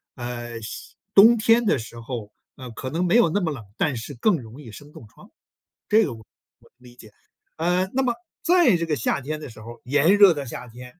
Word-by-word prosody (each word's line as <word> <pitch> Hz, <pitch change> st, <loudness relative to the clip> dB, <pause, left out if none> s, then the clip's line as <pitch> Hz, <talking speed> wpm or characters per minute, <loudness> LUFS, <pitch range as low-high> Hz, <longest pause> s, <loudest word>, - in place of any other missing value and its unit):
呃， 120 Hz, -2 st, -6 dB
湿 120 Hz, +2 st, -9 dB, 0.2 s
冬 220 Hz, +4 st, +8 dB
天 230 Hz, +2 st, +3 dB
的 205 Hz, -, +2 dB
时 115 Hz, +1 st, -10 dB
候， 115 Hz, -3 st, -7 dB, 0.2 s
呃， 130 Hz, -2 st, -10 dB
可 130 Hz, +3 st, -6 dB
能 170 Hz, +6 st, -1 dB
没 175 Hz, -, +2 dB
有 235 Hz, -8 st, +5 dB
那 205 Hz, +5 st, 0 dB
么 165 Hz, -, -1 dB
冷， 130 Hz, -7 st, -7 dB
但 145 Hz, -5 st, 0 dB
是 115 Hz, +5 st, -7 dB
更 180 Hz, -, +2 dB
容 115 Hz, +6 st, -12 dB
易 115 Hz, -6 st, -11 dB
生 145 Hz, +7 st, -13 dB
冻 110 Hz, -, -13 dB
疮。 205 Hz, -, -19 dB, 0.6 s
这 215 Hz, 0 st, +4 dB
个 130 Hz, -, -5 dB
我 110 Hz, -1 st, -13 dB, 0.3 s
我 -, -, -25 dB
理 125 Hz, -1 st, -17 dB
解。 110 Hz, -3 st, -15 dB, 0.5 s
呃， 180 Hz, +3 st, 0 dB
那 265 Hz, -, +1 dB
么 245 Hz, -, +1 dB, 0.3 s
在 345 Hz, -, +4 dB
这 170 Hz, -, -2 dB
个 155 Hz, -2 st, -1 dB
夏 125 Hz, +3 st, -1 dB
天 155 Hz, +3 st, -5 dB
的 150 Hz, -, -9 dB
时 110 Hz, -1 st, -13 dB
候 115 Hz, +2 st, -10 dB
儿， 120 Hz, -, -28 dB
炎 145 Hz, +9 st, +3 dB
热 200 Hz, -4 st, +7 dB
的 145 Hz, -2 st, -5 dB
夏 125 Hz, +1 st, -8 dB
天， 125 Hz, +7 st, -13 dB
145 Hz, 250 characters per minute, -23 LUFS, 120-185 Hz, 0.6 s, 冬